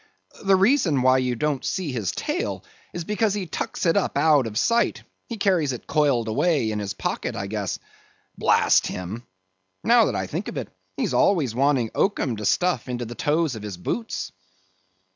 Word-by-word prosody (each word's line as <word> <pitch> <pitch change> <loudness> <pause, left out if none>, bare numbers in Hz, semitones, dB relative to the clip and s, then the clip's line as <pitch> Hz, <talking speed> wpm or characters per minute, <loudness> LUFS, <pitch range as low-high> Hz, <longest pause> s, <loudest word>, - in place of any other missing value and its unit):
The 195 -1 +5
reason 190 - +3
why 130 0 +5
you 125 -1 0
don't 145 +1 -1
see 180 -6 -2
his 110 -7 -2
tail, 320 +6 -3 0.3
is 175 - -5
because 210 +2 0
he 200 -3 -3
tucks 160 - -4
it 165 - +3
up 200 - 0
out 150 -6 +4
of 105 -1 -5
sight; 235 - +1 0.2
he 230 - -5
carries 180 -9 +2
it 125 - -8
coiled 140 -6 +1
away 140 0 +1
in 105 - -2
his 100 -2 -4
pocket, - - -3
I 100 - -3
guess. 100 -2 -3 0.6
Blast - - +3
him! 95 +7 -6 0.6
now 235 0 +5
that - - -1
I - - -1
think - - -4
of - - -5
it, - - -4 0.3
he's - - -1
always 155 - +2
wanting 130 -2 +1
oakum 140 - 0
to 105 - -5
stuff 180 - +1
into 120 -1 -3
the 115 - -7
toes 155 +3 0
of 110 - -7
his 105 -3 -6
boots." 225 - -4
145 Hz, 185 wpm, -24 LUFS, 115-185 Hz, 0.6 s, The